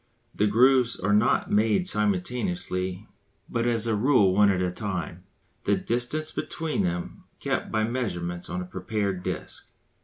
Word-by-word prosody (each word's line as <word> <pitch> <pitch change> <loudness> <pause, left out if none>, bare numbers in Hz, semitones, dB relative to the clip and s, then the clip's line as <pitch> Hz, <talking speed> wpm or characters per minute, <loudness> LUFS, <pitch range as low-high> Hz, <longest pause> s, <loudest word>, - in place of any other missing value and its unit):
The 105 - +2
grooves 125 +2 +4
are 100 +3 +1
not 105 - +2
made 110 - +3
simultaneously 105 - -1 0.4
but 115 0 -1
as 115 -2 +1
a 115 - +1
rule 105 -4 +4
one 100 +1 +5
at 95 -2 +1
a 90 -1 0
time, 90 -3 -5 0.4
the 100 - +3
distance 120 +10 -1
between 160 -8 -2
them 90 -1 -3
being - - 0
kept - - -9
by 110 0 +1
measurements 90 -8 -3
on 90 - -3
a - - -5
prepared 95 +1 -2
disc. - - -5
105 Hz, 155 wpm, -26 LUFS, 90-120 Hz, 0.4 s, one